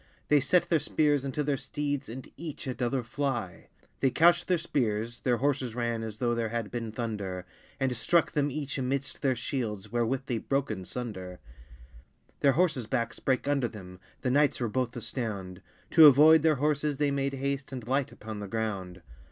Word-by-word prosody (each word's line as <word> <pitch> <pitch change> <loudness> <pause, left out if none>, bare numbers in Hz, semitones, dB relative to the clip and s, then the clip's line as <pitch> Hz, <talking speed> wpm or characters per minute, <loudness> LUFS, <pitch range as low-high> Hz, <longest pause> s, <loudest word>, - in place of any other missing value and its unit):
They 150 - +6
sett 145 +7 +3
their 165 - +3
speares 150 -1 +1
unto 140 +2 -2
their 140 -1 0
steeds, 145 -2 -3
And 125 +3 -7
eache 155 -1 -7
att 130 0 -4
other 125 +1 0
flie. 120 -6 -3 0.3
They 135 - +3
coucht 170 +6 +4
theire 180 -2 +2
speares 115 -7 -1
(their 125 -2 +1
horses 130 -2 0
ran, 120 -2 -1
As 110 -2 -6
though 120 0 +1
there 115 -1 -1
had 115 -2 -3
beene 115 -2 -4
thunder), 100 -5 -4 0.3
And 135 -1 +1
strucke 165 +8 +2
them 145 -2 +1
each 145 0 -4
immidst 135 +1 -2
their 135 -3 +1
shields, 110 -4 -4
Wherewith 120 +3 0
they 120 -4 -1
broke 135 0 -1
in 95 -3 -5
sunder. 95 -8 -6 1.0
Their 140 -2 +4
horsses 150 -7 +1
backes 115 -2 -2
brake 130 0 0
under 140 -4 +2
them, 90 -5 -11 0.2
The 125 - 0
knights 145 +1 +3
were 120 - 0
both 125 +1 -1
astound: 105 -6 -5 0.3
To 155 -3 +10
avoyd 155 +3 +7
their 155 0 +4
horsses 150 +1 0
they 145 0 +1
made 140 0 -1
haste 140 0 -3
And 125 -4 -6
light 135 +1 0
upon 110 -1 -8
the 100 - -5
ground. 95 -4 -4
130 Hz, 185 wpm, -29 LUFS, 115-140 Hz, 1.0 s, To